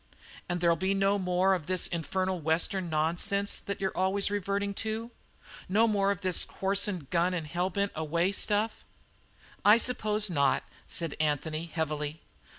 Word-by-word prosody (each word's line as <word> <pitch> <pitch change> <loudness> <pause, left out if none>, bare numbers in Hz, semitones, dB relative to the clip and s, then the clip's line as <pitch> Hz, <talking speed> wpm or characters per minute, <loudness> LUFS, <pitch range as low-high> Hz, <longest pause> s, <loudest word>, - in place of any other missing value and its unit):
"And 175 0 -1
there'll 170 -1 +4
be 190 +4 0
no 195 +1 +2
more 185 +1 +2
of 170 -5 -3
this 185 -1 +1
infernal 185 +2 -1
Western 170 +3 0
nonsense 175 +6 0
that 200 - -5
you're 190 -1 -2
always 195 +2 +1
reverting 200 0 -1
to? 225 +2 -4 0.6
No 220 +4 +4
more 200 -2 +2
of 200 -2 -1
this 185 -2 +3
horse 195 +2 0
and 180 -9 -4
gun 175 +1 +2
and 165 -3 -3
hell 175 +4 -1
bent 200 +2 -1
away 170 +4 0
stuff?" 210 +2 0 0.8
"I 210 +2 +7
suppose 215 -3 +2
not," 140 -7 +2 0.2
said 165 -3 -2
Anthony 155 +2 -1
heavily. 155 -1 -3
185 Hz, 155 wpm, -29 LUFS, 165-200 Hz, 0.8 s, I